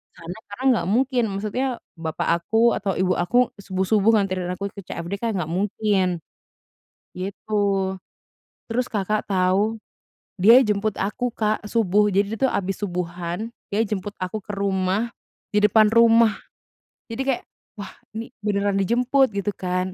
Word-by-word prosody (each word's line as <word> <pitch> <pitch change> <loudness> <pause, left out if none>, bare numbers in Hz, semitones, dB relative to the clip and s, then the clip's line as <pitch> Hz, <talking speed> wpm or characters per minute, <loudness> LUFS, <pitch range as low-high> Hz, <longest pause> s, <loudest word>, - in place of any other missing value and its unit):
Karena 170 +2 -8
karena 205 +6 -7
nggak 175 - -2
mungkin, 250 +2 +2
maksudnya 215 +7 -2 0.3
bapak 160 -2 -3 0.2
aku 230 +5 +3
atau 200 - -1
ibu 185 0 +2
aku 245 +8 +2
subuh-subuh 195 +2 +2
nganterin 185 -2 -2
aku 195 +2 -3
ke 200 - -9
CFD 175 +2 -5
kan 230 -1 0
nggak 175 -4 -2
mungkin, 190 -1 0 1.0
gitu, 195 0 -1 0.7
terus 245 +2 -2
Kakak 210 0 0
tahu? 195 +4 +2 0.6
Dia 230 +8 +8
jemput 210 -1 0
aku, 245 +5 -1
Kak, 215 -1 -1
subuh. 210 -2 +2
Jadi 200 +2 +1
dia 225 - -5
tuh - - 0
habis 195 -3 -2
subuhan, 180 +2 -4 0.2
dia 210 +3 +1
jemput 205 -1 -4
aku 185 +4 -4
ke 200 - -38
rumah, 195 +3 0 0.4
di 210 - +4
depan 210 +1 +5
rumah, 230 -1 +6 0.8
jadi 230 +3 -3
kayak, 265 -3 0 0.3
"Wah 200 -1 -7 0.3
ini 230 +2 -6
beneran 200 -1 0
dijemput," 250 +6 +3
gitu 200 +1 -1
kan. 185 0 -2
205 Hz, 145 wpm, -23 LUFS, 185-225 Hz, 1.0 s, Dia